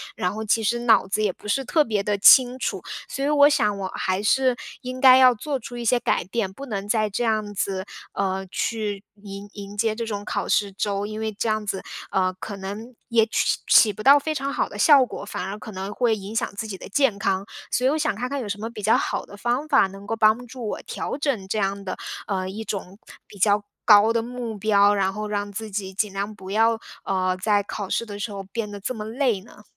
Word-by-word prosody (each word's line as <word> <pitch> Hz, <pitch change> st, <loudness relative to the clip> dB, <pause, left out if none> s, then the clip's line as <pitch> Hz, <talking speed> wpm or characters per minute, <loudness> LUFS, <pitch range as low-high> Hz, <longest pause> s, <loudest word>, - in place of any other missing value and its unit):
然 180 Hz, +1 st, -1 dB
后 220 Hz, -, -4 dB
其 225 Hz, +2 st, +2 dB
实 235 Hz, +3 st, +1 dB
脑 230 Hz, -5 st, +4 dB
子 215 Hz, +2 st, 0 dB
也 200 Hz, -, +2 dB
不 -, -, -13 dB
是 270 Hz, +6 st, +1 dB
特 310 Hz, +3 st, +3 dB
别 215 Hz, -6 st, -1 dB
地 205 Hz, 0 st, 0 dB
清 250 Hz, +4 st, +7 dB
楚， -, -, -2 dB, 0.3 s
所 275 Hz, -, -4 dB
以 290 Hz, -, +1 dB
我 290 Hz, -1 st, +6 dB
想 215 Hz, -9 st, +2 dB
我 190 Hz, -1 st, -4 dB
还 185 Hz, +1 st, -1 dB
是 255 Hz, +3 st, +3 dB, 0.3 s
应 255 Hz, 0 st, -6 dB
该 260 Hz, -1 st, +8 dB
要 255 Hz, -1 st, +7 dB
做 275 Hz, +4 st, -3 dB
出 245 Hz, +1 st, -9 dB
一 240 Hz, -, -4 dB
些 245 Hz, +2 st, +3 dB
改 -, -, 0 dB
变， 195 Hz, 0 st, -2 dB
不 275 Hz, +6 st, -8 dB
能 200 Hz, -2 st, -4 dB
再 215 Hz, -1 st, +1 dB
这 240 Hz, +5 st, -2 dB
样 215 Hz, -2 st, 0 dB
子， 190 Hz, -1 st, -2 dB, 0.3 s
呃， 190 Hz, 0 st, -1 dB
去 210 Hz, -3 st, -2 dB, 0.2 s
迎 200 Hz, 0 st, -8 dB
迎 200 Hz, 0 st, -9 dB
接 220 Hz, 0 st, +1 dB
这 230 Hz, -, -3 dB
种 205 Hz, -2 st, -4 dB
考 -, -, -3 dB
试 200 Hz, -1 st, +1 dB
周， 200 Hz, +1 st, -2 dB
因 215 Hz, 0 st, -6 dB
为 220 Hz, 0 st, -2 dB
这 220 Hz, +3 st, -2 dB
样 215 Hz, -1 st, -1 dB
子， 195 Hz, -2 st, -3 dB, 0.3 s
呃， 185 Hz, -1 st, +2 dB
可 205 Hz, -, -6 dB
能 205 Hz, +6 st, -7 dB
也 230 Hz, -2 st, +3 dB
起 225 Hz, -, +1 dB
起 215 Hz, -, +7 dB
不 215 Hz, -, -8 dB
到 280 Hz, +4 st, +8 dB
非 310 Hz, +2 st, -3 dB
常 275 Hz, -1 st, -2 dB
好 -, -, -1 dB
的 -, -, -9 dB
效 285 Hz, -4 st, +7 dB
果， -, -, -8 dB
反 -, -, -5 dB
而 200 Hz, +2 st, -5 dB
可 215 Hz, -, -9 dB
能 195 Hz, +1 st, -5 dB
会 235 Hz, -3 st, +2 dB
影 205 Hz, +2 st, -8 dB
响 -, -, +1 dB
自 220 Hz, +2 st, -4 dB
己 200 Hz, -3 st, -6 dB
的 -, -, -10 dB
健 250 Hz, -1 st, +2 dB
康。 195 Hz, 0 st, -1 dB, 0.3 s
所 250 Hz, -, +1 dB
以 -, -, +4 dB
我 300 Hz, -, +1 dB
想 310 Hz, -1 st, 0 dB
看 250 Hz, +3 st, -3 dB
看 280 Hz, -, -2 dB
有 240 Hz, -, -5 dB
什 205 Hz, 0 st, -4 dB
么 225 Hz, -, -4 dB
比 220 Hz, -3 st, -9 dB
较 220 Hz, -, +4 dB
好 -, -, -2 dB
的 -, -, -12 dB
方 245 Hz, +7 st, -1 dB
法， 275 Hz, -10 st, +4 dB
能 195 Hz, +1 st, -11 dB
够 225 Hz, +2 st, -2 dB
帮 220 Hz, +3 st, +3 dB
助 240 Hz, -1 st, -7 dB
我 -, -, -4 dB
调 -, -, -4 dB
整 275 Hz, -10 st, -1 dB
这 215 Hz, -, -2 dB
样 200 Hz, 0 st, -1 dB
的， 185 Hz, -, -5 dB, 0.3 s
呃， 190 Hz, -2 st, -2 dB
一 205 Hz, +4 st, -6 dB
种 195 Hz, -2 st, -6 dB, 0.3 s
比 205 Hz, -, -14 dB
较 205 Hz, +1 st, +3 dB, 0.2 s
高 215 Hz, +1 st, +7 dB
的 230 Hz, -, +1 dB
目 240 Hz, -1 st, -5 dB
标， 205 Hz, -1 st, +4 dB
然 190 Hz, -1 st, +1 dB
后 215 Hz, +1 st, -4 dB
让 205 Hz, -1 st, -3 dB
自 215 Hz, +1 st, -6 dB
己 190 Hz, -1 st, -3 dB
尽 210 Hz, -1 st, -1 dB
量 200 Hz, +2 st, -3 dB
不 190 Hz, -1 st, -9 dB
要， 225 Hz, +1 st, +3 dB, 0.3 s
呃， 185 Hz, -1 st, 0 dB
在 205 Hz, 0 st, +2 dB
考 200 Hz, -1 st, -6 dB
试 230 Hz, -, 0 dB
的 205 Hz, -2 st, -8 dB
时 205 Hz, +2 st, -4 dB
候 195 Hz, -1 st, -6 dB
变 210 Hz, +2 st, -5 dB
得 205 Hz, -, -7 dB
这 255 Hz, -, -3 dB
么 215 Hz, -, -5 dB
累 230 Hz, -2 st, 0 dB
呢？ 210 Hz, 0 st, -17 dB
215 Hz, 270 characters per minute, -24 LUFS, 200-235 Hz, 0.3 s, 该